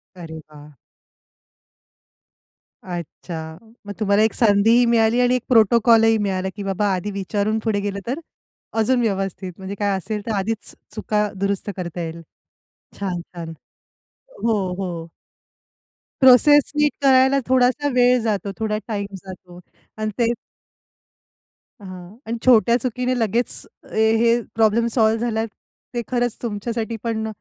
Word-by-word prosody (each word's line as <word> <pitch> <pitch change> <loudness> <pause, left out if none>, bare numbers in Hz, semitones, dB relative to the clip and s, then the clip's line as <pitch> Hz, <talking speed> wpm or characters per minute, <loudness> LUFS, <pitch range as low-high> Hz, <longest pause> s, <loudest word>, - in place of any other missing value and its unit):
अरे 165 -3 -9
वा! 150 -1 -15 2.1
अच्छा! 165 -2 -7 0.3
मग 205 - -5
तुम्हाला 205 -1 +2
एक 220 - +1
संधीही 225 +2 +4
मिळाली 230 0 +3
आणि 250 0 +3
एक 250 - -1
प्रोटोकॉल 230 -1 +5
ही 225 0 +4
मिळाला 190 -2 -1
की 205 - -6
बाबा 195 +1 -1
आधी 185 +3 -3
विचारून 205 +2 -1
पुढे 220 -2 -1
गेलं 200 0 -3
तर 260 +6 -2 0.6
अजून 245 +3 +2
व्यवस्थित 195 -3 -2
म्हणजे 190 +1 -6
काय 200 -2 +1
असेल 210 +3 -4
तर 225 - -3
आधीच 205 +3 -3 0.2
चुका 210 -1 0
दुरुस्त 200 +1 -2
करता 175 -1 -5
येईल. 165 0 -6 0.8
छान! 185 -3 -2
छान! 165 -2 -7 0.9
हो, 225 -2 +2 0.3
हो. 170 -3 -5 1.1
प्रोसेस 270 +3 +6
नीट 295 0 +3
करायला 265 0 +5
थोडासा 260 +3 +3
वेळ 250 0 +4
जातो, 205 -3 -2
थोडा 215 -1 -1
टाईम 205 -3 -2 0.2
जातो 185 -2 -11 0.4
अन् 215 - 0
ते 235 -1 +3 1.5
हां. 185 0 -10
आणि 230 +1 -2
छोट्या 235 -1 +5
चुकीने 250 +1 -1
लगेच 230 +2 0 0.4
हे 225 +2 +3 0.2
प्रॉब्लेम 225 +1 +3
सॉल्व्ह 220 -2 +3
झाला, 220 -1 -1
ते 235 +2 -10
खरंच 245 -2 -1
तुमच्यासाठी 230 +1 -3
पण 220 -2 -2
215 Hz, 130 wpm, -21 LUFS, 195-235 Hz, 2.1 s, प्रोसेस